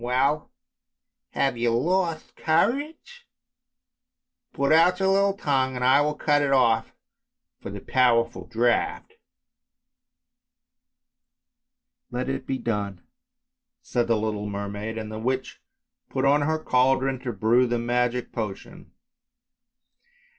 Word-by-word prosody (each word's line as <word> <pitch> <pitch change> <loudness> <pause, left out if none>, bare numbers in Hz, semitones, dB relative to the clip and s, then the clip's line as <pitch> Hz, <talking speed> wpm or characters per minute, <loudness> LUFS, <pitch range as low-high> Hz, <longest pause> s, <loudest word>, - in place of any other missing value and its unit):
Well! 135 +5 0 0.8
have 135 -3 0
you 120 0 +1
lost 170 +2 -1
courage? 295 - -1 1.2
Put 140 +1 0
out 175 +3 +5
your 190 0 +2
little 195 0 +2
tongue 130 -6 0
and 125 0 -2
I 135 +3 +5
will 150 +1 0
cut 145 -1 +2
it 140 -1 0
off 115 -4 +3
in - - -27
payment - - -45
for - - -7
the - - -7
powerful 120 -2 +1
draught." 120 - 0 0.7
" 245 - -58
Let 125 +2 -3
it 135 0 -4
be 135 - -1
done.*' 105 -6 -4 0.8
said 120 -2 -1
the 115 -1 +2
little 105 -1 -3
mermaid, 100 +2 -5
and 110 -1 -6
the 110 - -6
witch 130 +3 -3 0.5
put - - -1
on 145 +2 +4
her 155 +2 0
cauldron 135 -2 +1
to 125 -1 -4
brew 115 +4 +2
the 120 0 0
magic 120 +1 -1
potion. 105 -4 -7
130 Hz, 125 wpm, -25 LUFS, 115-155 Hz, 1.2 s, out